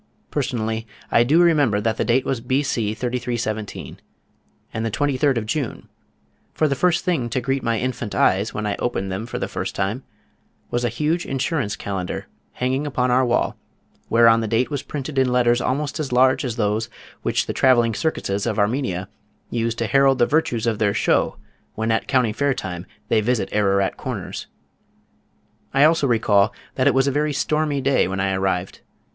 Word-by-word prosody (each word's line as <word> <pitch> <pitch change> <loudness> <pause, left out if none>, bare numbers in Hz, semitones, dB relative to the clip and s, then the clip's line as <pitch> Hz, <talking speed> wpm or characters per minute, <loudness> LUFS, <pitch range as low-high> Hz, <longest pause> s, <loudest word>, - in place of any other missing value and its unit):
Personally 110 -1 -2 0.2
I 115 - +5
do 150 +8 +3
remember 145 -11 +3
that 110 +1 -1
the - - +1
date 125 +2 +2
was 130 -4 -1
B. 130 +4 0
C. 110 -6 -1
3317, 120 -3 -3 0.7
and 110 - -2
the 115 - 0
twenty 145 +5 0
third 135 -1 +2
of 110 - -2
June, 125 +2 -3 0.7
for 155 - +2
the 140 - +1
first 175 +5 +1
thing 155 -10 0
to 125 - -1
greet 135 +2 -1
my 115 -1 0
infant 125 -2 -3
eyes, 100 +4 +2
when 105 - -4
I 105 - -1
opened 95 -6 -2
them 100 +5 -4
for - - -4
the - - -2
first - - -4
time, 100 +6 -1 0.7
was 120 0 0
a 120 - +1
huge 150 +9 -1
insurance 135 -4 -1
calendar 95 -3 -4 0.3
hanging 130 +4 -1
upon 125 -2 0
our 130 +1 +4
wall 120 -1 +1 0.5
whereon 115 0 +6
the 110 - -2
date 115 +6 +1
was 140 -2 -2
printed 140 -1 -4
in 130 -1 +2
letters 120 -1 +3
almost 145 +4 -1
as 145 -4 -3
large 130 +3 +4
as 125 -4 -3
those 110 0 0 0.3
which - - 0
the - - -3
travelling 120 -3 +4
circuses 100 -9 -1
of - - -1
Armenia 105 -4 0 0.4
use 115 -1 -1
to 115 - -2
herald 135 +2 +4
the 120 - +4
virtues 125 -7 0
of 115 -3 0
their 100 -2 +1
show - - +1 0.4
when 110 +1 -1
at 110 - 0
County 125 -5 +2
Fair 140 +3 +1
time 90 -1 -6 0.2
they 110 - +3
visit 120 +1 0
Ararat 100 -2 +1
Corners. - - -5 1.3
I 135 - +6
also 155 -2 +4
recall 110 -2 +3 0.2
that 130 +1 +1
it 140 - +4
was 135 0 +4
a 140 - +2
very 150 +2 0
stormy 150 0 0
day 135 +1 +2
when 95 +1 -3
I 95 0 +1
arrived. 95 -1 -2
120 Hz, 185 wpm, -22 LUFS, 110-135 Hz, 1.3 s, whereon